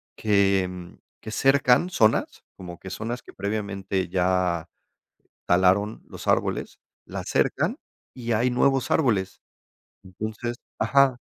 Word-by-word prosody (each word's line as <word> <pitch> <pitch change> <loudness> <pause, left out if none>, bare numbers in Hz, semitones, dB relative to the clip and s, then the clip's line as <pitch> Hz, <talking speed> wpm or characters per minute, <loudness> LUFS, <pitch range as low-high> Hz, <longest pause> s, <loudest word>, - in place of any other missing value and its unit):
que 95 -4 +1 0.3
que 110 - -7
cercan 135 +5 +3
zonas, 110 -10 +1
como 90 -2 -9
que 95 - -9
zonas 120 +3 -4
que - - -14
previamente 100 -2 -3
ya 90 -2 +1 0.8
talaron 95 +4 +3
los - - -10
árboles, - - 0 0.3
las - - -6
cercan - - +1 0.4
y 120 -2 -4
hay 120 +4 +2
nuevos 130 +1 +2
árboles. 100 -10 +1 0.6
Entonces 110 +5 -5 0.2
ajá, 135 -2 +4
105 Hz, 110 wpm, -25 LUFS, 95-120 Hz, 0.8 s, ajá